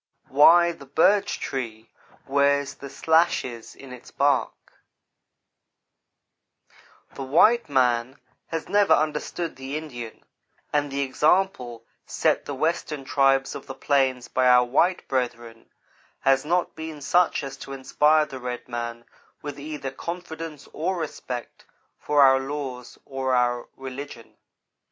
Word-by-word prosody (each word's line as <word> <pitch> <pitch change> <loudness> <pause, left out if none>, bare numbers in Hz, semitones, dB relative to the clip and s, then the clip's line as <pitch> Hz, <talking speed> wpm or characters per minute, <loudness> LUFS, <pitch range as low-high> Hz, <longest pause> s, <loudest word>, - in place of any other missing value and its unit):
WHY 170 +5 +6
THE 145 -5 -12
BIRCH 200 +8 +2
TREE 115 -4 -5 0.3
WEARS 140 0 +2
THE 140 +1 -10
SLASHES 135 -6 0
IN 135 -2 -11
ITS 125 - -12
BARK 140 -1 0 2.4
THE - - -8
white 170 - +4
man 125 -1 +1 0.3
has 165 -1 -4
never 205 -1 +4
understood 155 +2 -2
the 135 +3 -5
Indian, 120 -8 -8 0.5
and 145 -1 +1
the 140 +1 -1
example 140 -3 0 0.2
set - - 0
the 145 - -5
Western 155 -1 -2
tribes 135 -1 +2
of - - -9
the 135 - -7
plains 130 -2 +1
by 130 0 +1
our 125 0 +6
white 170 +9 +1
brethren 120 -3 -3 0.5
has 135 +1 +3
not 175 +3 0
been 160 -1 -7
such 175 +3 +2
as 135 -1 -6
to 135 - -10
inspire 150 +3 +2
the 135 -3 -9
red 125 -1 -6
man 120 -1 -5 0.4
with 145 -1 -6
either 145 -2 -5
confidence 165 -1 -7
or 175 +4 -2
respect 130 -6 -6 0.4
for 145 -1 +3
our 135 0 +6
laws 135 -3 -6
or 130 -1 -1
our 120 -1 +1
religion. 135 -2 -9
135 Hz, 130 wpm, -24 LUFS, 130-155 Hz, 2.4 s, WHY